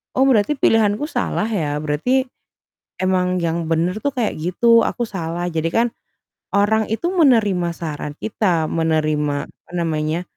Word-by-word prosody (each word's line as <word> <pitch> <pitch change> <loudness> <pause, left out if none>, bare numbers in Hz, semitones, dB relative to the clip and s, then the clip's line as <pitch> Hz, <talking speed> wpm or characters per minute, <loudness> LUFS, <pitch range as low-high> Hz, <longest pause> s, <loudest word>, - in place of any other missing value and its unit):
“Oh 265 - +4
berarti 265 +2 +3
pilihanku 220 0 +2
salah 215 - -1
ya, 160 -10 -1
berarti 205 - +1 0.8
emang 185 -1 +1
yang 165 0 -1
bener 170 +5 0
tuh 285 -1 -2
kayak 235 -4 0
gitu, 230 +8 +4
aku 240 - -2
salah.” 175 -4 -4
Jadi 165 0 -1
kan 235 +5 +2 0.7
orang 210 +2 +3
itu 340 +11 -1
menerima 220 - +3
saran 150 -2 -5
kita, 185 -7 0
menerima 155 -2 0 0.2
apa - - -29
namanya, 160 -1 -1
185 Hz, 140 wpm, -20 LUFS, 160-225 Hz, 0.8 s, Oh